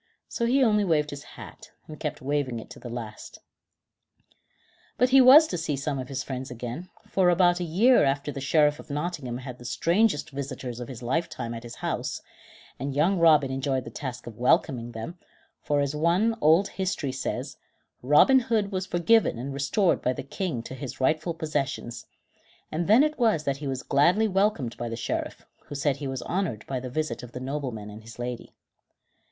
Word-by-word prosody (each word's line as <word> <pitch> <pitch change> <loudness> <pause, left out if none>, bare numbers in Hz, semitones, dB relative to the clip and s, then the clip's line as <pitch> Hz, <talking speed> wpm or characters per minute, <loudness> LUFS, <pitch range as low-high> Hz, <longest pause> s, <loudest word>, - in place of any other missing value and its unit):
So 235 - -1
he 265 +3 +4
only 210 -3 +3
waved 155 -5 +1
his 145 -1 -7
hat, - - -12 0.2
and 155 -1 -10
kept 150 -4 -4
waving 135 -4 -1
it - - -12
to - - -10
the 120 - -8
last. 115 -3 -7 1.6
But 250 - +3
he 265 +1 +7
was 270 +5 +9
to - - -2
see 155 -3 -1
some 140 0 -3
of 130 - -6
his 135 -1 -3
friends 130 -1 -5
again, 125 +8 -6 0.2
for 185 -2 +3
about 175 0 +4
a - - -1
year 205 +10 +4
after 140 +1 0
the 140 - -6
Sheriff 150 +1 +3
of - - -12
Nottingham 145 -5 -3
had 125 -1 -8
the - - -11
strangest 170 - +1
visitors 130 -3 -5
of 120 - -6
his 125 -1 -9
life 165 +8 0
time 120 -2 -5
at 115 - -6
his 120 0 -9
house, - - -3 0.6
and 135 +1 -3
young 170 +6 +2
Robin 155 -5 +5
enjoyed 135 0 -1
the - - -9
task 125 -3 -6
of 115 -2 -10
welcoming 125 -3 +1
them, 140 +11 -7 0.4
for 145 -1 +1
as 140 +1 -1
one 175 +9 +2
old 165 +6 +5
history 180 -7 -2
says, 135 +1 -4 0.4
Robin 150 - +6
Hood 220 -4 0
was 185 -1 -3
forgiven 190 - +3
and 135 +4 -5
restored 140 +8 +1
by 125 - +1
the - - -6
King 140 -4 -3
to 130 - -8
his 130 -1 -7
rightful 155 +5 +1
possessions, 140 -6 -3 0.6
and 165 +2 -2
then 225 +7 +6
it 305 -1 -1
was 220 -10 +2
that 140 -2 -1
he 145 0 -6
was 130 -1 -3
gladly 175 +10 +3
welcomed 195 - 0
by 120 0 -4
the 115 - -4
Sheriff, 115 - -4 0.2
who 145 - -7
said 140 -1 0
he 140 -1 -5
was 130 -1 -4
honored 170 - -2
by 130 -2 -3
the 130 0 -6
visit 155 +4 -2
of 120 -1 -11
the - - -5
nobleman 130 -6 -4
and 105 +2 -10
his 115 0 -12
lady. 120 0 -6
145 Hz, 200 wpm, -26 LUFS, 130-175 Hz, 1.6 s, was